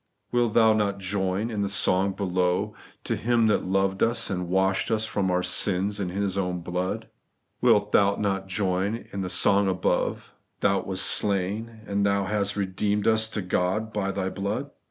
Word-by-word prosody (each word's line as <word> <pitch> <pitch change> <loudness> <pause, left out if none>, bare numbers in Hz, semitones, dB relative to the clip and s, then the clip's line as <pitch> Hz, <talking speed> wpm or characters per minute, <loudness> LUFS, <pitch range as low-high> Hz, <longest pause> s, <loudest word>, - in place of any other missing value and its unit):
Wilt 120 -3 +1
thou 110 -1 +5
not 105 -2 0
join 95 +3 -2
in 105 -2 -2
the 100 - 0
soi^ 95 0 +2
below, 90 +1 0 0.2
' - - -30
To - - -1
Him 115 0 +1
that 110 - +1
loved 95 +1 0
ns, 115 -2 +2
and 90 -2 -3
washed 95 +1 +1
ns 110 -1 +1
from 100 -3 -1
our 90 0 +1
sins 100 +2 +2
in 95 -3 -2
His 100 +1 -2
own 90 -2 -2
blood 90 +2 -3 0.3
'? - - -48
Wilt 105 0 +3
thou 100 0 +4
not 95 -2 -2
join 95 +3 -1
in 100 - -3
the 90 - -3
song 100 +2 +3
above, 95 -1 -1
' - - -49
Thou 100 -1 +2
wast 95 -1 0
slain, 105 +3 0
and 100 0 -1
hast 100 0 0
re 100 - 0
deemed 100 +2 -1
us 110 0 +3
to 105 -2 -4
God 95 +5 -1
by 100 -2 -1
Thy 95 -1 -2
blood 100 +2 -4
100 Hz, 190 wpm, -25 LUFS, 95-105 Hz, 0.3 s, thou